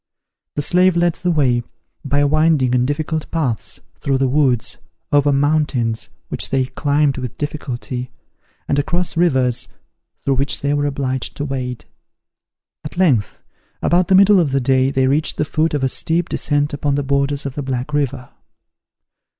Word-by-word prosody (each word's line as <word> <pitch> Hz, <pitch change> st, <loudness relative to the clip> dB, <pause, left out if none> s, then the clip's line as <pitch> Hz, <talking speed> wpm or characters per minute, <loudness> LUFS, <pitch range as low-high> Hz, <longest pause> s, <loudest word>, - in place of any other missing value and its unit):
The 145 Hz, -, -1 dB
slave 180 Hz, +3 st, +3 dB
led 175 Hz, 0 st, +3 dB
the 180 Hz, +1 st, -3 dB
way, 135 Hz, -7 st, +2 dB, 0.4 s
by 145 Hz, +1 st, +1 dB
winding 150 Hz, -3 st, +3 dB
and 125 Hz, 0 st, +2 dB
difficult 155 Hz, +2 st, -2 dB
paths, 135 Hz, -10 st, -2 dB, 0.2 s
through 135 Hz, +6 st, 0 dB
the 135 Hz, 0 st, +1 dB
woods, 130 Hz, -3 st, +1 dB, 0.3 s
over 145 Hz, 0 st, +4 dB
mountains, 140 Hz, -5 st, 0 dB, 0.2 s
which -, -, 0 dB
they 130 Hz, -1 st, +1 dB
climbed 140 Hz, +1 st, 0 dB
with 125 Hz, -3 st, -6 dB
difficulty, 125 Hz, -4 st, -4 dB, 0.6 s
and 145 Hz, -, +1 dB
across 175 Hz, +4 st, -1 dB
rivers, 130 Hz, -8 st, +2 dB, 0.6 s
through 135 Hz, -1 st, +1 dB
which 140 Hz, +2 st, 0 dB
they 145 Hz, +1 st, 0 dB
were 145 Hz, 0 st, +1 dB
obliged 135 Hz, -2 st, -3 dB
to 145 Hz, -, -2 dB
wade. 130 Hz, -3 st, -4 dB, 1.0 s
At 150 Hz, +2 st, -8 dB
length, 140 Hz, -, +1 dB, 0.4 s
about 175 Hz, 0 st, +3 dB
the 190 Hz, -, +4 dB
middle 200 Hz, +1 st, +6 dB
of 165 Hz, -5 st, +2 dB
the 135 Hz, -, +3 dB
day, 130 Hz, +1 st, +2 dB
they 135 Hz, -1 st, +1 dB
reached 145 Hz, +4 st, +1 dB
the 150 Hz, -, +1 dB
foot 155 Hz, +1 st, 0 dB
of 140 Hz, -, -1 dB
a -, -, +3 dB
steep 165 Hz, +6 st, -1 dB
descent 145 Hz, 0 st, 0 dB
upon 145 Hz, 0 st, 0 dB
the 145 Hz, -, 0 dB
borders 140 Hz, +1 st, 0 dB
of 140 Hz, -, -3 dB
the 145 Hz, -, -4 dB
Black 130 Hz, +1 st, -3 dB
River. 140 Hz, -3 st, -2 dB
140 Hz, 165 wpm, -19 LUFS, 130-150 Hz, 1.0 s, middle